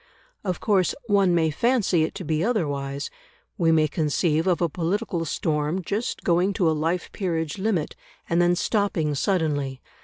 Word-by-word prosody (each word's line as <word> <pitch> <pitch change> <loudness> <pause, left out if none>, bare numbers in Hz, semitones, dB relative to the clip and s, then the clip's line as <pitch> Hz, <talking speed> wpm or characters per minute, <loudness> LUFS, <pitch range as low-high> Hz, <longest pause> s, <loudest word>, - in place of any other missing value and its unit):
Of 185 -4 -2
course 195 -5 +2
one 200 -5 +3
may 160 -2 +2
fancy 220 - +2
it 155 - -1
to 190 - -5
be 155 0 0
otherwise; 145 - -2 0.4
we 165 -2 +2
may 155 -1 +4
conceive 155 +2 0
of 180 -2 +2
a 170 - +2
political 175 +2 -2
storm 155 +3 -1
just 210 +7 -3
going 180 +3 +2
to 180 -3 +1
a - - +4
life 165 +3 -1
peerage 165 -2 -2
limit, 190 -6 -1 0.3
and 170 +1 +2
then 175 0 +3
stopping 180 -7 0
suddenly. 145 -5 0
170 Hz, 160 wpm, -24 LUFS, 155-190 Hz, 0.4 s, may